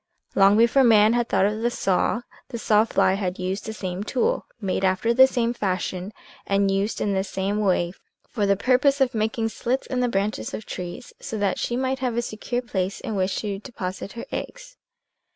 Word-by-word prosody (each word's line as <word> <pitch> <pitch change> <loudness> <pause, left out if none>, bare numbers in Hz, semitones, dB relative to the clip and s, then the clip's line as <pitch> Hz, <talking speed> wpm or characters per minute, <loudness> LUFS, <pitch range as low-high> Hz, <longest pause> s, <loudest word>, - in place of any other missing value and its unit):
Long 200 +1 +5
before 235 +4 +5
man 220 -2 +6
had 240 -1 0
thought 190 - +3
of 210 +2 -1
the 240 - +2
saw, 210 0 0 0.3
the 240 - -6
saw 215 -1 +3
fly 190 - +2
had 190 -2 -2
used 185 +3 -3
the - - -3
same 190 -3 -4
tool, 265 - 0
made 195 -3 -2
after 190 +5 +2
the 260 +2 +7
same 240 -3 0
fashion, 185 -2 -2 0.4
and 195 0 +2
used 195 +3 -1
in 200 - 0
the 190 0 +1
same 195 +1 -2
way 180 -4 +1 0.3
for 205 -3 -1
the 200 0 +3
purpose 260 +6 +3
of 265 -1 +2
making 225 +1 0
slits 250 +4 -2
in 255 - -2
the 250 -1 +1
branches 205 0 -2
of 215 - -8
trees 180 +7 -7
so 220 - -5
that 205 -2 0
she 240 - -1
might 260 +1 -1
have 250 -3 -1
a 240 - +1
secure 240 +2 -3
place 195 -4 -2
in 220 - -5
which 190 0 0
to 200 -2 -3
deposit 195 -2 -6
her 235 - -7
eggs. - - -6
215 Hz, 205 wpm, -24 LUFS, 195-240 Hz, 0.4 s, the